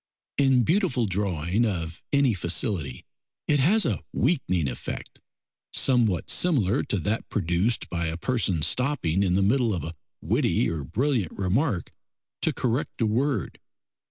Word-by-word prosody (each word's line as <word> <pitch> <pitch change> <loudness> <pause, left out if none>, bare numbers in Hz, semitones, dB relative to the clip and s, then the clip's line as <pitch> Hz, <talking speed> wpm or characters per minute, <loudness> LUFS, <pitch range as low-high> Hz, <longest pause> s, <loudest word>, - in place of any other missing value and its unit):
In 135 -3 +4
beautiful 165 - +1
drawing 95 0 0
of 85 -7 -2
any 140 -4 +3
facility 85 - -2 0.4
it 145 - +3
has 200 +11 +4
a 110 - -1
weakening 110 - +1
effect, 65 - -6 0.5
somewhat 115 -9 +2
similar 135 - +2
to 105 - -1
that 105 +6 -2
produced 95 +4 0
by 85 -1 -2
a 80 +1 -3
person 95 -7 0
stopping 110 - +1
in 90 -2 +2
the 95 - +3
middle 115 0 +2
of 85 - -4
a 80 - -5 0.3
witty - - +1
or 80 -3 -3
brilliant 120 - -1
remark 100 - 0 0.5
to - - +2
correct 125 +2 -2
a 115 - +2
word. 115 - -1
105 Hz, 140 wpm, -26 LUFS, 85-130 Hz, 0.5 s, In